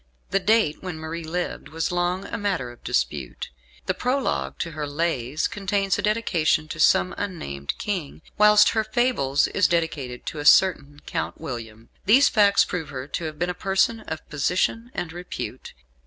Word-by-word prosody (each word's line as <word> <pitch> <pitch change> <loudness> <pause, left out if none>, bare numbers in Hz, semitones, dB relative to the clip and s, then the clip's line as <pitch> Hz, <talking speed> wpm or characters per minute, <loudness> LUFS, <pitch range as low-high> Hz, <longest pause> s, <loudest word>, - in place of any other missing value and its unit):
The 195 - +3
date 215 -6 +2
when 180 -3 -5
Marie 160 +1 -5
lived 175 +3 -4
was 160 +1 -2
long 180 +2 0
a - - -5
matter 190 - -2
of 120 - -17
dispute. 65 +1 -2 0.3
The - - +1
Prologue 260 +2 -1
to 165 - -3
her 150 -1 -4
"Lays" 145 -2 -1
contains 200 -2 -1
a - - +1
dedication 175 -8 +1
to 165 - -6
some 180 +3 +4
unnamed 70 - -4
King; 175 -7 -4
whilst 210 0 +6
her 220 -1 +1
"Fables" 215 - +1
is 200 - +3
dedicated 150 -7 -2
to 155 - -5
a 145 - -5
certain 145 -4 +4
Count - - -3
William. 115 -6 -7 0.2
These 255 +7 +6
facts 200 -2 +4
prove 165 -5 -4
her 130 -1 -6
to 170 - -3
have 155 -1 -5
been 175 +2 0
a - - -5
person 195 +5 +1
of 160 - -6
position 185 - 0
and 165 -2 -4
repute. 175 +1 -7
170 Hz, 170 wpm, -24 LUFS, 145-200 Hz, 0.3 s, whilst